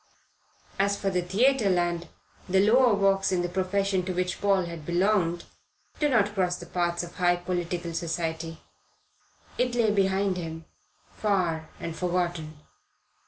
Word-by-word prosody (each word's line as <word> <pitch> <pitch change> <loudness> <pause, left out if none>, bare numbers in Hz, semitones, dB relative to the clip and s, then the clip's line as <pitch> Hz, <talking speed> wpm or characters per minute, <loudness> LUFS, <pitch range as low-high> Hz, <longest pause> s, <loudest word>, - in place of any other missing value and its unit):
As 200 +1 +2
for 195 -1 -1
Theatreland, 180 -3 +1 0.4
the 190 +1 +4
lower 250 -3 +5
walks 195 -1 +2
in 180 -1 +1
the - - 0
profession 190 +1 0
to 185 - -2
which 180 0 -2
Paul 195 -3 +2
had 170 -2 -7
belonged 175 0 +1 0.6
do 295 - +2
not 210 -5 +2
cross 180 -3 +1
the 175 - -9
paths 175 0 -1
of 175 - -10
high 175 -1 +3
political 175 -1 -3
society. 165 -1 -3 1.0
It 250 -1 +1
lay 225 -3 +3
behind 195 -1 +1
him 165 -2 -6 0.5
far 175 -7 -1
and 165 -1 -5
forgotten. 175 -3 -2
180 Hz, 135 wpm, -27 LUFS, 170-195 Hz, 1.0 s, lower